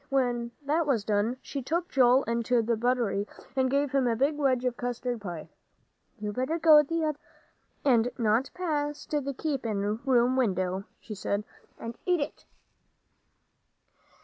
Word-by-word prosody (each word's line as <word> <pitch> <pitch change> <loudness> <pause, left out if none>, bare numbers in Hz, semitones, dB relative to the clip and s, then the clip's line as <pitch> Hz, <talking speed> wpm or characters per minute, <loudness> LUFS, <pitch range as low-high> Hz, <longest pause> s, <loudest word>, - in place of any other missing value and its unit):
When 245 -3 0
that 305 +3 +1
was 240 -7 +2
done, 210 +4 0
she 275 - -5
took 335 +7 -2
Joel 255 0 +5
into 235 +1 +1
the 230 +1 +1
buttery 230 -3 0 0.3
and 260 -1 +2
gave 280 +1 +1
him 270 -3 +2
a 230 - +2
big 275 +6 +1
wedge 260 -4 +1
of 250 -1 0
custard 245 -1 -3
pie. 175 -6 -6 0.7
"You 210 -1 -4
better 260 +8 -1
go 315 -2 +7
t'other 315 +1 -1
way, 295 - -14 0.7
and 245 -3 +4
not 230 +2 +2
past 295 -4 -2
the 285 -2 0
keepin' 220 -8 -1
room 255 -1 +3
window," 190 -5 0
she 215 - -8
said, 200 0 -2 0.3
"and 230 0 -6
eat 360 -1 +3
it." 285 +1 -5
250 Hz, 150 wpm, -28 LUFS, 225-285 Hz, 0.7 s, go